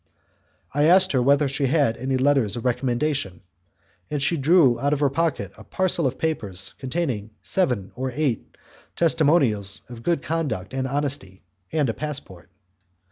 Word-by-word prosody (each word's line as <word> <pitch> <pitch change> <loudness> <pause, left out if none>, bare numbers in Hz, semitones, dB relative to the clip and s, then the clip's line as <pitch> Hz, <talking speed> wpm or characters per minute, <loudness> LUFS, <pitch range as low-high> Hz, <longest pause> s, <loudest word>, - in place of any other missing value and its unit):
I 145 +1 +2
asked 185 +4 +5
her 130 - +2
whether 140 +3 +3
she 135 +1 -1
had 140 -5 +2
any 130 +2 -1
letters 130 -6 +2
of 120 - -6
recommendation, 125 -3 -1 0.7
and 150 - -2
she 150 +5 +1
drew 145 -4 +4
out 140 +3 +1
of 145 - -1
her 145 -2 +2
pocket 165 +3 -1
a - - -11
parcel 175 -5 0
of 130 - -4
papers 100 - -2
containing 130 -7 -3
seven 120 - 0
or 130 +1 -3
eight 140 -4 -2 0.4
testimonials 145 - +2
of 120 -2 -9
good 165 +3 0
conduct 135 - -3
and 130 0 -1
honesty, 135 -10 -3 0.3
and 150 -4 +1
a 115 - -1
passport. 110 - -5
135 Hz, 155 wpm, -23 LUFS, 120-150 Hz, 0.7 s, asked